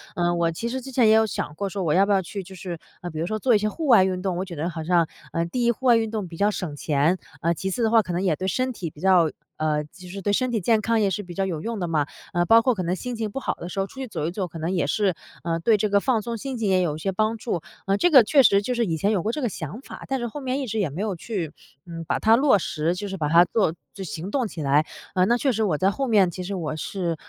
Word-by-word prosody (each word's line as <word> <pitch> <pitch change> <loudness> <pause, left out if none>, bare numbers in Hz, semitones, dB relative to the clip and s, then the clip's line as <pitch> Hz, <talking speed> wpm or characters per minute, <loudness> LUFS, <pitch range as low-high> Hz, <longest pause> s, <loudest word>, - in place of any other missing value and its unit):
嗯， 175 0 +1
我 170 -1 +2
其 200 +8 -4
实 260 +2 -3
之 265 +2 -9
前 245 -3 +4
也 215 - +6
有 220 0 +5
想 185 -7 -4
过， 200 +5 -2
说 195 +1 -4
我 155 -3 +1
要 195 +4 +5
不 205 - -1
要 195 -1 +4
去 195 +3 -6
就 190 - -12
是， 180 -2 -6 0.2
呃， 175 - -5
比 155 - -8
如 165 - 0
说 215 +4 -2
做 245 0 +3
一 - - +6
些 210 +1 0
户 315 +7 -4
外 230 -7 +7
运 185 -1 -1
动， 185 -2 -1
我 185 - -2
觉得 170 -2 -4
好 165 -2 -5
像 170 0 +3 0.2
呃， 165 - 0
第 240 +9 -2
一， 235 - +5
户 260 +3 -8
外 240 - +7
运 225 -1 -1
动 210 -4 -3
比 165 -1 -10
较 205 +1 +3
省 180 -7 -4
钱， 150 +4 +1 0.2
呃， 170 0 +2
其 190 +3 -3
次 240 - -2
的 220 - +3
话， 225 0 +5
可 185 - -6
能 175 - 0
也 180 -5 +2
对 185 +3 -3
身 255 +7 0
体 175 -6 -5
比 150 - -17
较 180 -4 +4 0.3
呃， 155 -1 0
就 180 +4 -14
是 195 +1 -7
对 205 +2 0
身 255 +4 +1
体 225 - +1
健 220 +4 +3
康 225 +1 +1
也 200 -2 +2
是 205 +1 -3
比 180 - -9
较 195 +2 -1
有 165 -5 -3
用 230 +1 -4
的 175 - -2
嘛。 155 -3 +1 0.3
呃， 175 0 +2
包 225 +4 +6
括 255 +1 +2
可 185 - -2
能 175 +2 0
心 250 +5 -5
情 220 -2 -3
不 270 - -4
好 - - -1
的 175 - -8
时 195 - -4
候， 195 - 0
出 270 - -13
去 260 - -4
走 155 -9 -4
一 165 - -1
走， 185 0 -3
可 165 - -8
能 160 - -2
也 175 - +1
是， 200 -5 +1 0.3
呃， 165 0 -1
对 220 +4 +4
这 210 +1 0
个 200 0 +4
放 235 -3 +1
松 235 +1 -4
心 265 +1 -5
情 220 -3 0
也 185 -1 +3
有 160 -4 0
一 155 - -8
些 195 +4 -1
帮 215 +3 0
助。 215 -8 -3 0.3
嗯， 195 +1 +2
这 355 - +3
个 260 -5 +9
确 275 +4 +5
实 200 -4 +5
就 250 +5 -2
是 235 -1 +1
以 165 -3 -1
前 200 +7 +1
有 195 -5 +1
过 220 - 0
这 300 - -4
个 245 - +1
想 165 - -6
法， - - -10
但 270 -1 -1
是 240 - -2
后 290 +6 -7
面 265 +1 -2
一 275 - -2
直 220 0 -2
也 190 -7 +1
没 155 +8 -5
有 210 -3 -1
去， 175 -4 -4 0.3
呃， 165 -1 -7
把 - - 0
它 220 +1 +5
落 265 -3 +4
实， 160 +1 -1
就 205 +3 -5
是 195 - -5
把 150 -4 -1
它 170 +3 +7
做 195 -5 +1 0.3
行 175 +2 -6
动 255 -3 0
起 165 - -7
来。 145 +2 +3 0.4
那 240 +2 +3
确 270 +2 +1
实 225 -2 -1
我 180 -8 +1
在 190 +5 +2
后 270 +6 -2
面， 205 -6 +4
其 185 - -6
实 195 +2 -4
我 160 -4 -3
是 170 +1 -3
195 Hz, 350 characters per minute, -24 LUFS, 170-225 Hz, 0.4 s, 个